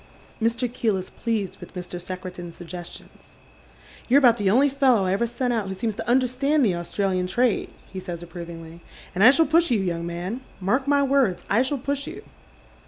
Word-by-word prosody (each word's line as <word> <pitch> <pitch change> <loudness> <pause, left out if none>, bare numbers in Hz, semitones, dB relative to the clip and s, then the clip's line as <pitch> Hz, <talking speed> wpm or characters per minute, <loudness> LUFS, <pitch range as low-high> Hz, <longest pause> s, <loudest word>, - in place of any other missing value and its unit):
Mr. 230 +2 +1
Keel 225 -4 0
is 185 - -7
pleased 220 -5 -3
with - - -12
Mr. 180 0 -6
Secretan's 180 -1 -7
suggestions. 175 0 -10 0.4
" - - -23
You're 260 - +6
about 245 -4 +6
the 200 -2 +2
only 260 +8 +5
fellow 265 -7 +3
I 185 - +1
ever 235 +4 +1
sent 245 +1 -1
out 220 -4 -1
who 190 - -4
seems 220 +3 -2
to - - -4
understand 260 +3 +2
the 195 - +2
Australian 180 +1 -1
trade," 240 +4 +1 0.2
he 190 - -4
says 175 -2 -6
approvingly, 170 -1 -9 0.2
" - - -19
and 190 +2 +1
I 250 - +10
»hall 325 +4 +4
push 330 +3 +3
you, 235 -4 +2
young 170 -3 -2
man, 180 +8 -4 0.2
mark 245 +9 0
my 285 0 +4
words, 265 -9 +2
I 215 +4 +4
shall 265 +2 0
push 280 +2 -3
you." - - -8
210 Hz, 200 wpm, -24 LUFS, 180-255 Hz, 0.4 s, I